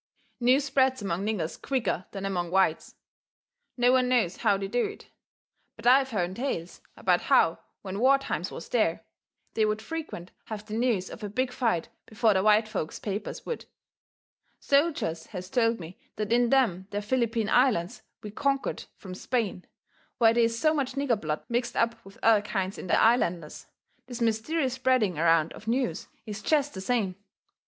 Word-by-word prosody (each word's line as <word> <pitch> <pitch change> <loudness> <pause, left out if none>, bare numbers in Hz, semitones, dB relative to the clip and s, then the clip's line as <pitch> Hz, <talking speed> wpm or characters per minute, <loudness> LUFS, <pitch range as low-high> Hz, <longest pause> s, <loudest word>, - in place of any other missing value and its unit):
News 255 +3 +4
spreads 265 -4 +2
among 185 -1 -2
niggers 180 -7 -3
quicker 250 -8 -1
than 195 -1 -5
among 175 -3 -2
whites. 185 -3 +1 0.8
No 245 0 +4
one 255 -1 +3
knows 225 -8 +1
how 200 - +2
they 195 0 -4
do 240 +5 0
it. - - -6 0.7
But - - -13
I've 265 +2 +5
hearn 185 -6 -1
tales 190 -8 -4 0.2
about - - +2
how - - +3 0.2
when 195 0 -5
war 265 +3 +5
times 275 - -3
was - - -8
there, - - +1 0.5
they 220 - +1
would 215 0 +1
frequent 220 - -6
have 215 -1 -7
the 215 - -8
news 225 -5 0
of - - -9
a 210 - -4
big 255 +5 -1
fight 220 -10 0 0.2
before 220 -1 +2
the 190 - +2
white 215 +2 +4
folks' 160 -7 -4
papers 205 0 -5
would. 475 - -5 0.9
Soldiers 280 - +1
has 185 -2 -8
told 230 -2 +2
me 170 +1 -10 0.2
that 215 +1 -1
in 240 0 +3
them 210 -9 +2
there 205 +1 -3
Philippine 230 -1 0
Islands 215 -6 +2 0.2
we 210 - -6
conquered 275 +4 -1
from 185 -2 -9
Spain, 200 -2 -2 0.5
where 225 -2 +5
they 235 0 +4
is 230 0 -1
so 310 +6 +3
much 270 -4 -1
nigger 270 -6 0
blood 155 -1 -3
mixed 240 +1 -1
up 230 0 0
with 195 - -15
other 225 -2 +5
kinds 195 -2 -3
in - - -7
the - - +3
islanders, 175 -9 +1 0.4
this 245 -2 -7
mysterious 240 +5 0
spreading 255 -10 +1
around 165 -1 +3
of 220 - -13
news 250 +2 -1 0.2
is 215 -1 -6
jest 290 +3 +1
the 190 - -6
same. 195 -4 -1
225 Hz, 175 wpm, -27 LUFS, 190-255 Hz, 0.9 s, I've